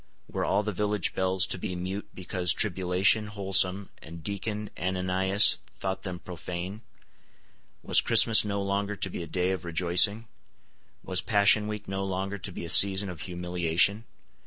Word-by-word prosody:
Were - - -2
all 100 +2 +1
the 105 - -3
village 105 -1 -2
bells 95 0 +2
to 95 - -4
be 90 - -5
mute 95 +3 -5
because 90 -1 0
Tribulation 95 +2 +1
Wholesome 95 -1 +1
and 80 +1 -11
Deacon 105 +3 -5
Ananias 95 +2 +2 0.2
thought 95 0 -3
them 90 -2 -6
profane? 90 +3 -7 1.0
Was - - +4
Christmas 115 -2 +5
no 100 -1 -3
longer 100 +1 -2
to 95 - -3
be - - -6
a 85 - -7
day 90 +3 -1
of 95 - -4
rejoicing? 90 +6 +3 0.8
Was 90 -1 -1
Passion 105 -1 +3
week 105 -1 -6
no 95 0 -3
longer 95 +1 -4
to 95 - -5
be 85 - -7
a - - -6
season 100 +2 +4
of 85 -4 -8
humiliation? 90 +3 -1
95 Hz, 160 wpm, -27 LUFS, 90-100 Hz, 1.0 s, Christmas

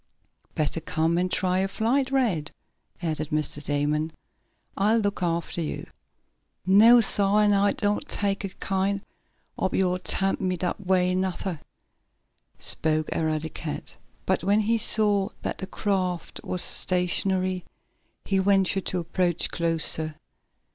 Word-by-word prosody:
"Better 155 +1 -1
come 160 +2 0
and 185 0 -1
try 185 -1 +1
a 190 - +1
flight, 250 +7 0
Rad," 220 - 0 0.5
added 155 -2 -2
Mr. 150 -1 -1
Damon. 150 +2 -1 0.6
"I'll 210 +3 +2
look 205 -4 -1
after 170 0 -2
you." 155 - -4 0.8
"No, 220 +6 +7
sah, 205 -2 +2
an' 210 -1 +4
I 200 0 +3
doan't 205 0 -1
take 200 0 -1
it 195 - -7
kind 195 +1 -1 0.6
ob - - -1
yo' 185 -1 +2
all 180 - -2
t' - - -4
tempt 195 0 0
me 185 -1 0
dat 180 +3 -3
way, 185 -1 +2
nuther," 185 -2 -2 1.0
spoke 155 -1 +2
Eradicate. 155 -1 -3 0.3
But, 190 -2 0
when 205 +3 +3
he 225 +2 +1
saw 210 -3 +3
that - - -4
the 190 - -5
craft 185 -4 -2
was 180 - +1
stationary, 185 0 +1 0.6
he 195 -1 +1
ventured 195 0 +2
to 185 - -1
approach 175 0 -1
closer. 160 -2 +1
185 Hz, 135 wpm, -25 LUFS, 165-200 Hz, 1.0 s, No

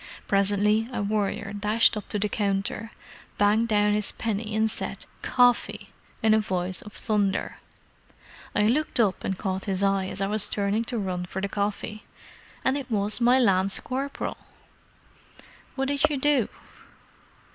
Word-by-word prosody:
Presently 205 +2 +2
a 230 -4 -2
warrior 205 0 -1
dashed 210 +3 +3
up 210 - -6
to 210 - -1
the 210 +1 0
counter, 200 +1 -2 0.5
banged 210 +3 +3
down 210 -1 +3
his 210 -1 +1
penny 215 -1 -3
and 220 0 +3
said 220 - -4 0.2
'Coffee!' 245 -1 +2 0.3
in 220 -1 +5
a 220 - +5
voice 185 -3 -2
of 210 - -12
thunder. 205 -3 -1 1.0
I 210 - +3
looked 260 +5 +1
up 205 -5 +2
and 190 - -2
caught 190 -1 -3
his 195 -1 0
eye 195 -1 +2
as 190 - -6
I 195 - +1
was 210 +1 +2
turning 205 +3 0
to 240 - -3
run 185 -3 -2
for 190 - -5
the 195 - -1
coffee—and 210 +6 -4
it 265 -2 -8
was 210 +1 +1
my 245 +2 +5
lance 195 -5 +3
corporal!" 275 +2 -4 1.4
"What 270 0 -1
did 285 +1 +2
you 295 - -1
do?" 275 -4 +2
210 Hz, 155 wpm, -26 LUFS, 200-230 Hz, 1.4 s, in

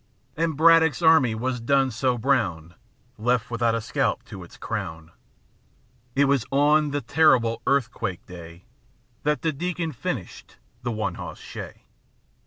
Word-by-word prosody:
And 160 -2 -1
Braddock's 165 0 +5
army 140 -8 +5
was 125 +2 -2
done 135 +2 +2
so 125 +2 0
brown. 100 - 0 0.5
Left 120 +1 0
without 115 -1 +1
a 115 - -2
scalp - - -1
to 95 -2 -10
its 85 - -15
crown. 85 -7 -5 1.0
It 140 +1 +4
was 140 -4 +2
on 150 +2 +3
the 145 0 -2
terrible 120 -4 +3
earthquake 115 -8 -1
day 85 -1 -12 0.6
That 150 0 -1
the 160 - +1
Deacon 170 +2 -3
finished 125 - -6 0.3
his 120 - -2
one 110 -1 -2
hoss - - -7
shay. - - -9
125 Hz, 140 wpm, -24 LUFS, 110-145 Hz, 1.0 s, Braddock's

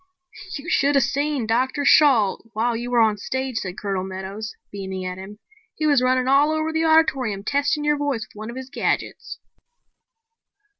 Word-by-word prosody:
"You 285 +4 -10
should 285 -5 +2
have 275 - +4
seen 285 -3 -1
Dr. 260 +6 0
Shalt 245 -9 +4
while 230 +2 0
you 240 +2 -4
were 240 -1 +3
on 215 -2 +3
stage," 260 +3 -3
said 185 -1 -6
Colonel 195 -2 -2
Meadows, 190 +3 -6 0.2
beaming 190 -2 -5
at 180 0 -5
him. 200 +2 -10 0.4
"He 310 - -2
was 285 -4 +4
running 255 0 +2
all 280 +3 +4
over 315 0 -1
the 320 0 +1
auditorium 270 -11 +2
testing 285 +4 0
your 295 0 +2
voice 285 -6 -1
with - - -24
one 215 +2 -7
of 235 - -7
his 260 0 -8
gadgets." - - -2
255 Hz, 180 wpm, -22 LUFS, 210-285 Hz, 0.4 s, have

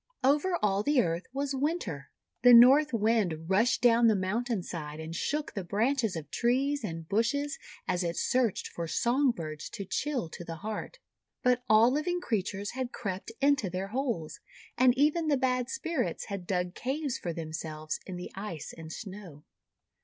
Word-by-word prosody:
Over 300 +7 +3
all 200 -1 +2
the 290 +4 +2
Earth 170 -5 0
was 275 +1 -2
Winter. 270 - -2 0.3
The 245 0 +9
North 270 +6 +8
Wind 210 -8 +1
rushed 225 +7 +3
down 235 -1 +6
the 220 - +4
mountain 210 +2 -1
side, 155 -3 -6
and 160 +1 -6
shook 295 - -2
the 195 - -3
branches 225 +3 0
of 155 -3 -7
trees 265 +3 +1
and 165 -5 -5
bushes 240 - 0 0.3
as 180 0 0
it 170 0 -2
searched 250 -6 +1
for 170 -1 -5
song 255 - +2
birds 155 -9 -4
to 200 - -6
chill 260 - -2
to 175 - -8
the 165 -1 -6
heart. 215 -1 -5 0.5
But 250 0 +3
all 220 +3 +6
living 350 +6 0
creatures 205 - -2
had 255 -1 -4
crept 190 -3 -5
into 280 -8 +3
their 185 +2 -4
holes, 230 - -2 0.4
and 250 0 +4
even 305 +3 +2
the 290 -2 +3
bad 255 -1 0
Spirits 330 -8 -2
had 195 -3 -5
dug 180 -2 -1
caves 270 +2 -2
for 175 - -3
themselves 155 -1 -5
in 185 - -5
the 180 - -7
Ice 195 -6 -6
and 160 -1 -9
Snow. 185 -6 -9
225 Hz, 170 wpm, -29 LUFS, 180-265 Hz, 0.5 s, The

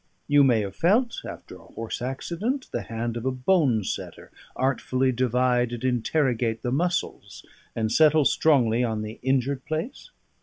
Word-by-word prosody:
You 145 -1 +5
may 120 -5 +3
have 100 -2 -5
felt 230 +8 +1
(after - - -10
a - - -18
horse 115 +1 -6
accident) 175 - -3
the - - -2
hand 115 +1 -4
of 115 - -5
a 130 - 0
bone 130 - +2
setter - - -6 0.2
artfully 130 0 0
divide 125 0 +1
and 120 - -6
interrogate 125 -2 0
the 120 - -1
muscles, 175 +6 -2 0.3
and 110 -1 -1
settle 155 +2 +4
strongly 125 -8 +3
on 110 -3 -2
the 110 +2 -8
injured 130 0 0
place? 165 - -5
130 Hz, 155 wpm, -25 LUFS, 115-155 Hz, 0.3 s, You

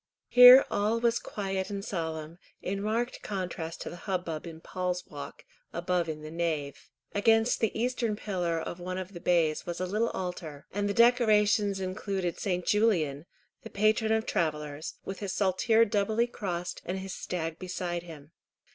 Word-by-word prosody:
Here 250 +2 +10
all 215 +3 +1
was 235 0 +2
quiet 195 -1 -3
and 200 0 -4
solemn, 160 -2 -4 0.2
in 195 +1 -3
marked 230 +4 -1
contrast 175 -4 -4
to - - -4
the - - -7
hubbub 175 -4 -2
in 160 -1 -9
"Paul's 180 +1 -3
Walk," 145 -1 -9 0.3
above 175 -1 -1
in 155 -1 -5
the 155 - -7
nave. 160 -4 -3 0.2
Against 225 +3 +3
the 225 -1 0
eastern 235 -2 0
pillar 180 -6 -2
of 170 - -6
one 185 +1 -4
of 185 +1 -6
the 175 - -7
bays 165 -3 +1
was 175 - -4
a 185 - -1
little 215 +5 0
altar, 170 -5 -5
and 205 +1 0
the 200 - -1
decorations 215 -4 +4
included 190 -1 -3
St. 180 -2 -1
Julian, 170 -9 +1 0.3
the - - -9
patron 215 +2 +2
of 220 0 +2
travellers, 150 -2 -2
with 195 - -5
his 200 -3 -3
saltire 215 +4 +3
doubly 215 +2 +1
crossed, 180 -7 -4
and 185 +2 -3
his 190 0 -6
stag 165 -2 -4
beside 180 -2 -3
him. 160 -3 -12
185 Hz, 165 wpm, -29 LUFS, 170-210 Hz, 0.3 s, Here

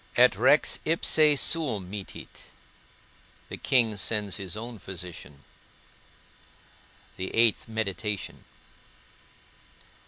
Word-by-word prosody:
ET - - +6
REX - - +3
IPSE 155 -2 +3
SUUM 130 - 0
MITTIT. 100 0 -10 1.0
The - - -6
King 120 -5 +2
sends 105 -1 0
his 95 0 -5
own 115 0 -7
physician. 90 -6 -10 1.8
VIII. 110 +4 +3
MEDITATION. 105 -2 -4
105 Hz, 75 wpm, -27 LUFS, 95-120 Hz, 1.8 s, ET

